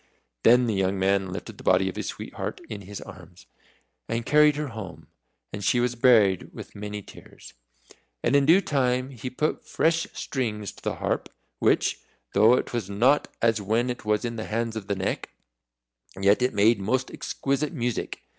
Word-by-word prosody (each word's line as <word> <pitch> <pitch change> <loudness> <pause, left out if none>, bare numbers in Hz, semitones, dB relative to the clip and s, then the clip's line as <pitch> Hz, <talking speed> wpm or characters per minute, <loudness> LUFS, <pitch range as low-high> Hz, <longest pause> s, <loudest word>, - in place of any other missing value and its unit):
Then 125 - +6
the 115 - 0
young 95 0 0
man 95 0 +1
lifted 95 - -7
the - - -11
body 95 +1 +3
of 95 - -4
his - - -4
sweetheart - - -5
in 105 - -6
his 100 +1 -8
arms, 90 -1 -13 0.6
and 115 0 -2
carried 150 0 +5
her 150 -1 -3
home, 90 - -8 0.5
and 100 0 -5
she 120 - +3
was 120 0 +1
buried 115 -6 +4
with - - -10
many 105 0 -6
tears. - - -14 0.7
And 130 - +2
in 140 -1 +4
due 175 +5 +7
time 130 -4 0
he 125 0 -6
put 150 +5 -2
fresh 165 +1 +1
strings 105 -7 -3
to - - -17
the - - -2
harp, - - -2 0.3
which, - - +2 0.3
though 110 +5 +6
it - - -3
was 115 -5 -2
not 125 +9 +3 0.2
as 115 -2 +3
when 115 +5 0
it 120 - -7
was 105 +1 0
in 115 -1 -4
the 110 - -4
hands 115 +1 -2
of 105 -3 -6
the 100 - 0
Neck, 95 0 -3 0.9
yet 100 +4 +4
it 125 -2 +1
made 105 +2 +4
most 125 +7 -1
exquisite 140 +2 -2
music. 125 -7 -3
115 Hz, 185 wpm, -26 LUFS, 100-125 Hz, 0.9 s, due